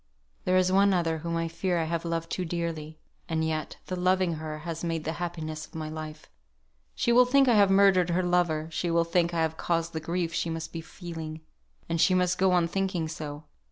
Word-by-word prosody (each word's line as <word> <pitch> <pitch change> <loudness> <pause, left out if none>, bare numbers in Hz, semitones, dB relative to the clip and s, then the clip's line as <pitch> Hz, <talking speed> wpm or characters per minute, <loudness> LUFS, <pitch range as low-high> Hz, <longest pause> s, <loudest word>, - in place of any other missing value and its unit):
There 185 0 +3
is 185 0 +3
one 195 0 +4
other 165 -2 0
whom 170 +1 -3
I 165 0 -1
fear 175 +2 -1
I 165 - +1
have 165 +1 -2
loved 165 -1 -3
too 185 - -1
dearly; 165 -2 -4 0.3
and 160 -1 0
yet, 155 -1 -3
the 185 - -3
loving 180 -1 +2
her 155 -1 -5
has 165 -1 -4
made 165 -2 -2
the 160 - -2
happiness 155 -3 -4
of - - -20
my 155 -1 -4
life. 155 0 -7 0.7
She 235 - +1
will 245 +1 +7
think 270 +2 +4
I 245 - +5
have 205 -2 +5
murdered 195 -2 +5
her 180 +2 +1
lover; 175 -3 +1
she 170 +2 -2
will 170 0 +3
think 170 0 +1
I 165 -1 +1
have 160 0 -2
caused 165 -1 -1
the 160 - -2
grief 170 +1 -2
she 170 - -1
must 165 0 -5
be 165 - -4
feeling. 160 -2 -7 0.5
And 165 -1 0
she 185 - +5
must 180 0 +1
go 190 0 +4
on 175 -2 +3
thinking 185 -2 -1
so. 155 -1 -6
170 Hz, 225 wpm, -28 LUFS, 160-180 Hz, 0.7 s, will